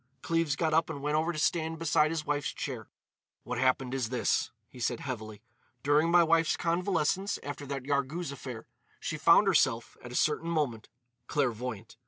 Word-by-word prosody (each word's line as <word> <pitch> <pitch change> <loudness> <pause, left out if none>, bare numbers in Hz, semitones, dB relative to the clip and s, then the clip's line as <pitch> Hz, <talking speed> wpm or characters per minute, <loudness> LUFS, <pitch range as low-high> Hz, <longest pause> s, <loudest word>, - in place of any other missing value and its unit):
Cleves 165 -4 +1
got 160 0 0
up 160 +1 +3
and 155 -3 -5
went 150 +1 0
over 160 +2 +1
to 160 - -6
stand 160 +1 0
beside 155 -1 +3
his 160 -2 -3
wife's 145 -1 -1
chair. - - -5 0.5
"What 125 -1 -4
happened 130 0 +1
is 130 -4 -1
this," 125 -2 +1 0.2
he 125 - -14
said 120 0 -1
heavily. 110 -5 -6 0.4
"During 150 +3 +3
my 175 0 +6
wife's 165 -1 +3
convalescence 180 +2 0
after 145 0 -6
that 135 -1 -4
Yarghouz 140 +3 -1
affair, 125 -4 -7 0.3
she 155 - -3
found 170 +6 +6
herself, 135 -11 +2
at 125 - -8
a - - -6
certain 155 +4 +1
moment, 140 -9 -1 0.4
clairvoyant. 120 -5 -2
145 Hz, 175 wpm, -30 LUFS, 125-165 Hz, 0.5 s, my